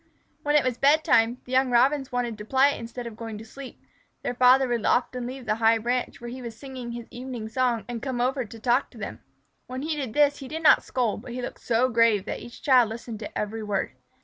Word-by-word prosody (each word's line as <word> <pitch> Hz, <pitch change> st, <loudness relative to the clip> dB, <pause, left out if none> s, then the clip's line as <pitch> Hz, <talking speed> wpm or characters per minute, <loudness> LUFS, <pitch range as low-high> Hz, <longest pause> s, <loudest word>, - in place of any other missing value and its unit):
When 295 Hz, 0 st, +1 dB
it 295 Hz, -, +5 dB
was 255 Hz, -2 st, -1 dB
bedtime, 280 Hz, -5 st, +5 dB
and 240 Hz, -, -7 dB
the 250 Hz, -, -11 dB
young 260 Hz, 0 st, +3 dB
Robins 265 Hz, +3 st, +3 dB
wanted 245 Hz, -2 st, -1 dB
to -, -, -6 dB
play 270 Hz, +5 st, +3 dB
instead 235 Hz, +1 st, -7 dB
of 230 Hz, -2 st, -7 dB
going 225 Hz, -1 st, -6 dB
to 220 Hz, -, -10 dB
sleep, 265 Hz, +3 st, -10 dB, 0.4 s
their -, -, -1 dB
father 255 Hz, +2 st, +5 dB
would 240 Hz, -3 st, -1 dB
often 250 Hz, 0 st, +1 dB
leave 255 Hz, 0 st, -7 dB
the 215 Hz, -, +1 dB
high 225 Hz, 0 st, +5 dB
branch 245 Hz, +3 st, -2 dB
where 240 Hz, 0 st, -7 dB
he 255 Hz, +1 st, -7 dB
was 230 Hz, -2 st, -7 dB
singing 255 Hz, -3 st, -7 dB
his 235 Hz, -1 st, -6 dB
evening 245 Hz, -3 st, -6 dB
song 240 Hz, -3 st, 0 dB
and 240 Hz, -2 st, -5 dB
come 260 Hz, -2 st, -3 dB
over 255 Hz, +2 st, +1 dB
to 225 Hz, 0 st, -11 dB
talk 245 Hz, +4 st, +1 dB
to -, -, -16 dB
them. -, -, -7 dB, 0.5 s
When 255 Hz, +2 st, -5 dB
he 310 Hz, 0 st, -1 dB
did 265 Hz, -7 st, -4 dB
this 290 Hz, -1 st, +4 dB
he 270 Hz, -, -8 dB
did 320 Hz, +4 st, -5 dB
not 310 Hz, -, +7 dB
scold, 240 Hz, -5 st, -1 dB
but 240 Hz, 0 st, -9 dB
he 250 Hz, -, -4 dB
looked -, -, -7 dB
so 240 Hz, +2 st, +2 dB
grave 230 Hz, -4 st, +3 dB
that -, -, -4 dB
each 240 Hz, -, -12 dB
child 250 Hz, -5 st, +5 dB
listened 225 Hz, -1 st, -7 dB
to 210 Hz, -, -7 dB
every 215 Hz, +2 st, -3 dB
word. 205 Hz, -2 st, -2 dB
245 Hz, 245 wpm, -26 LUFS, 230-260 Hz, 0.5 s, not